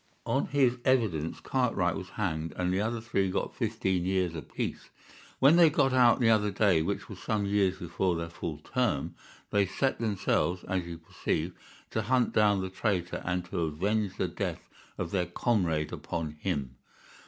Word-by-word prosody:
On - - +1
his 130 -3 +2
evidence 105 - +1
Cartwright 115 -10 +1
was 90 -1 -6
hanged 80 -6 -2
and 90 0 0
the 95 - +1
other 115 +2 -1
three 100 -4 0
got - - -2
fifteen 95 -2 0
years 90 -2 0
apiece. 80 - -5 0.5
When 140 +5 +6
they 170 -2 +8
got 135 -3 +2
out 125 -2 +5
the 115 -2 +4
other 105 -2 +3
day, 95 -4 +3
which 100 +5 -2
was - - -9
some 105 -2 -1
years 100 -2 +2
before 90 +1 -1
their 85 0 -4
full 80 -2 -5
term, 85 - -1 0.4
they 100 -1 +3
set 130 +8 0
themselves, 95 -4 0
as 90 -2 -2
you 85 -1 -6
perceive, 80 +1 -3 0.4
to 110 - 0
hunt 125 +3 +1
down 105 -3 +4
the 95 - -3
traitor 95 -3 -1
and 90 0 -1
to - - -2
avenge 95 +6 -1
the - - 0
death - - -4 0.3
of 85 -2 -3
their 90 -3 0
comrade 90 -6 0
upon 80 -3 -4
him. 75 -5 -3
95 Hz, 175 wpm, -29 LUFS, 85-110 Hz, 0.5 s, they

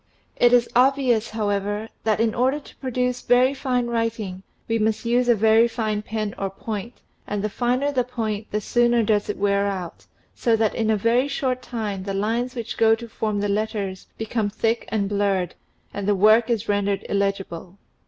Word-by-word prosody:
It 240 - +4
is 240 -1 +4
obvious, 250 -3 +3
however, 205 0 -2 0.2
that 215 -1 +2
in 225 -1 +2
order 260 +4 +1
to 285 - -16
produce 250 -1 -1
very 255 +2 +4
fine 255 -3 -1
writing 230 -5 -2 0.3
we 225 0 0
must 220 +2 0
use 245 +1 +2
a 240 - +6
very 220 +2 +5
fine 215 -3 -2
pen 215 -1 -3
or 195 - -1
point 215 +4 -6 0.3
and 205 -1 -2
the 210 - -1
finer 250 +6 0
the 255 -3 +1
point 220 -4 -3
the 210 - -2
sooner 240 +2 +2
does 210 -1 +1
it 210 - -2
wear 200 0 +1
out, 185 -4 -5 0.3
so 230 -2 +2
that 220 -1 +1
in 220 -1 -1
a 220 - +3
very 235 +6 +2
short 255 -3 -1
time 215 -6 -4
the 195 +1 -4
lines 230 +5 -1
which 235 -1 -5
go 225 0 +5
to 235 +1 -9
form 215 -2 -2
the 205 - 0
letters 205 -2 -2
become 220 -1 -1
thick 225 +3 -1
and 205 -3 0
blurred 195 -3 0 0.4
and 200 -1 -4
the 205 - +3
work 215 +4 +5
is 230 -2 0
rendered 205 -1 0
illegible. 195 -2 -2
220 Hz, 190 wpm, -23 LUFS, 205-240 Hz, 0.4 s, a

